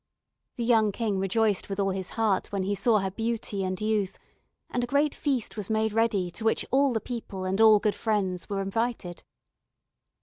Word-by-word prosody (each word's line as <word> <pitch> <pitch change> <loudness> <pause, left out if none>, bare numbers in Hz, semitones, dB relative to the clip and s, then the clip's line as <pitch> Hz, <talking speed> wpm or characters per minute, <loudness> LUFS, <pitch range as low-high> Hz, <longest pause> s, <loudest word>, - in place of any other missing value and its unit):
The 240 - -3
young 225 -3 +3
King 205 -2 -1
rejoiced 205 +1 +1
with 195 0 -4
all 195 -1 +1
his 190 -1 -4
heart 215 -4 +1
when 200 -2 -1
he 200 +2 -1
saw 215 +3 +3
her 190 0 -2
beauty 225 -2 -2
and 185 0 -2
youth, 210 -3 -1 0.5
and 245 - -1
a - - -2
great 285 +3 +2
feast 265 -6 -2
was 210 -2 -5
made 220 0 +1
ready 210 -5 +1
to 220 - -7
which 225 - +1
all 275 +1 +4
the 225 - 0
people 215 -6 -6
and 190 +3 0
all 220 -1 +8
good 210 0 +1
friends 195 -5 -1
were 195 -1 -1
invited. 195 -3 -3
215 Hz, 195 wpm, -27 LUFS, 195-230 Hz, 0.5 s, all